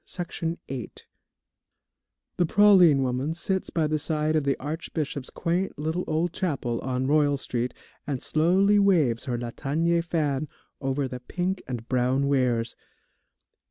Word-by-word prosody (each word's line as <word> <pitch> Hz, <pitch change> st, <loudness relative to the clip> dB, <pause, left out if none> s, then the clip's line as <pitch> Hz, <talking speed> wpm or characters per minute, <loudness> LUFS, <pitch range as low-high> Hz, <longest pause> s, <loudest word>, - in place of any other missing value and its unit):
THE 175 Hz, -, -1 dB
PRALINE 165 Hz, 0 st, -4 dB
WOMAN 130 Hz, -4 st, -6 dB, 1.5 s
The 175 Hz, -, +3 dB
praline 185 Hz, -8 st, +6 dB
woman 130 Hz, +4 st, -1 dB
sits 190 Hz, +2 st, -1 dB
by 160 Hz, -2 st, 0 dB
the 155 Hz, 0 st, 0 dB
side 155 Hz, +1 st, 0 dB
of 155 Hz, -2 st, +1 dB
the 140 Hz, -, +1 dB
Archbishop's 150 Hz, -2 st, -4 dB
quaint 180 Hz, +1 st, -2 dB
little 160 Hz, +4 st, -2 dB
old 165 Hz, +2 st, 0 dB
chapel 135 Hz, -11 st, -2 dB
on 130 Hz, 0 st, -2 dB
Royal 145 Hz, 0 st, +3 dB
Street, 125 Hz, -2 st, -3 dB, 0.3 s
and 140 Hz, -3 st, -2 dB
slowly 190 Hz, +9 st, +3 dB
waves 160 Hz, -, +3 dB
her 125 Hz, -2 st, -2 dB
latanier 155 Hz, +8 st, 0 dB
fan 155 Hz, -4 st, -1 dB, 0.3 s
over 135 Hz, 0 st, -1 dB
the 125 Hz, -1 st, -6 dB
pink 180 Hz, +8 st, -3 dB
and 120 Hz, -2 st, -5 dB
brown 130 Hz, +2 st, +1 dB
wares. 125 Hz, -4 st, +1 dB
150 Hz, 140 wpm, -26 LUFS, 130-170 Hz, 1.5 s, praline